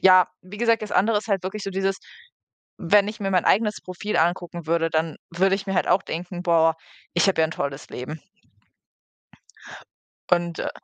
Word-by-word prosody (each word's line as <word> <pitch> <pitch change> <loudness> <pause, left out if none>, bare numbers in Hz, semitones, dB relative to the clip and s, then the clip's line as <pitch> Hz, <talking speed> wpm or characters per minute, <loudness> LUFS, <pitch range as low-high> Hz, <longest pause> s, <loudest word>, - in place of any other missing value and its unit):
ja, 185 -1 +7 0.2
wie 185 +3 -11
gesagt, 230 -1 +2
das 210 -1 -6
andere 210 +4 +3
ist 215 - -9
halt 195 -3 +1
wirklich 200 +3 -4
so 195 - -3
dieses 195 0 0 0.8
wenn 200 +4 +4
ich 215 +1 -7
mir 195 -1 -1
mein 185 -2 +2
eigenes 210 0 +2
Profil 185 +3 -4
angucken 175 0 -1
würde, 165 0 +1
dann 160 0 -1
würde 190 +3 +2
ich 195 +1 -5
mir 195 - -2
halt - - +1
auch 185 +2 +3
denken: 175 +1 -5
„Boah, 165 -2 +4 0.4
ich 175 +3 +3
habe 190 - +2
ja - - +4
'n - - -8
tolles 140 -1 -4
Leben.“ 150 +5 -6 2.1
Und, 175 -1 +1
äh - - -2
185 Hz, 190 wpm, -24 LUFS, 170-200 Hz, 2.1 s, ja